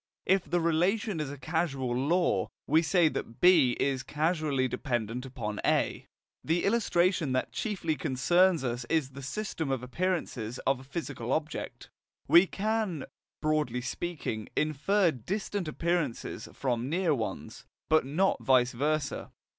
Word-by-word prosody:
If 190 -1 +3
the 175 - +2
relation 175 +4 +1
is 150 -3 -2
a 145 - -7
causal 135 -4 -1
law, 165 +8 +1 0.2
we 160 - +4
say 170 +1 +3
that 115 -5 -6
B 165 -9 +5
is 135 -2 +1
causally 150 -4 0
dependent 120 -1 -3
upon 110 -5 -4
A. - - +1 0.4
The 165 +2 +1
illustration 185 - +2
that 130 - -1
chiefly 185 -8 -2
concerns 165 +6 +2
us 120 -1 -2
is 155 -5 +1
the 140 +1 -9
system 160 0 -3
of 130 -2 -1
appearances 130 -6 -2
of 135 -1 +2
a - - -11
physical 135 -4 -5
object. 155 +1 -3 0.4
We 175 +3 +7
can, 210 -7 -1 0.4
broadly 150 -6 +1
speaking, 125 -4 -4
infer 165 +5 +2
distant 190 - -3
appearances 165 -4 -2
from 125 -1 -2
near 170 0 +2
ones, 115 -6 -5 0.2
but 155 0 +4
not 165 +9 +1
vice 125 -2 +4
versa. 145 +3 -1
155 Hz, 140 wpm, -29 LUFS, 130-175 Hz, 0.4 s, We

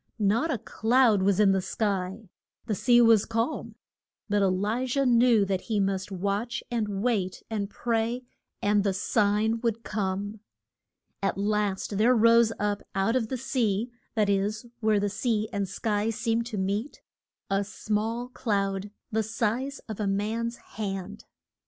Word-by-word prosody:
Not 220 +9 +2
a 270 - 0
cloud 225 -1 +3
was 195 0 +2
in 205 -2 +6
the 190 -1 +2
sky. 195 +1 -2 0.4
The 225 - -1
sea 240 +4 +4
was 225 -3 +6
calm. 230 +6 -2 0.5
But 205 0 +2
E - - +4
li 205 +7 0
jah 275 +2 +1
knew 235 -3 +5
that 190 -1 -1
he 215 -2 +1
must 195 0 -1
watch, 200 +5 -2
and 210 -4 -1
wait, 200 -7 0
and 205 -2 -2
pray, 235 +2 -1 0.4
and 205 0 +3
the 195 -2 0
sign 215 +3 +1
would 230 -1 -1
come. 205 +1 -3 0.8
At 195 -1 0
last 205 -1 -1
there 245 +4 +5
rose 230 0 +5
up 205 0 -1
out 195 +5 +1
of 240 -4 +1
the 260 - -3
sea 235 -3 0 0.2
that 215 -2 +2
is, 200 +3 0
where 215 -2 +2
the 205 - 0
sea 215 +1 -1
and 200 -2 -1
sky 210 +2 -1
seem 225 +1 0
to 230 -3 -5
meet 200 +8 -2 0.5
a 195 +1 +2
small 220 +4 -2
cloud, 200 -5 -1 0.2
the 220 0 +1
size 235 +5 -1
of 220 -2 -6
a 210 - 0
man's 220 +4 -1
hand. 200 -2 -6
215 Hz, 160 wpm, -27 LUFS, 200-230 Hz, 0.8 s, in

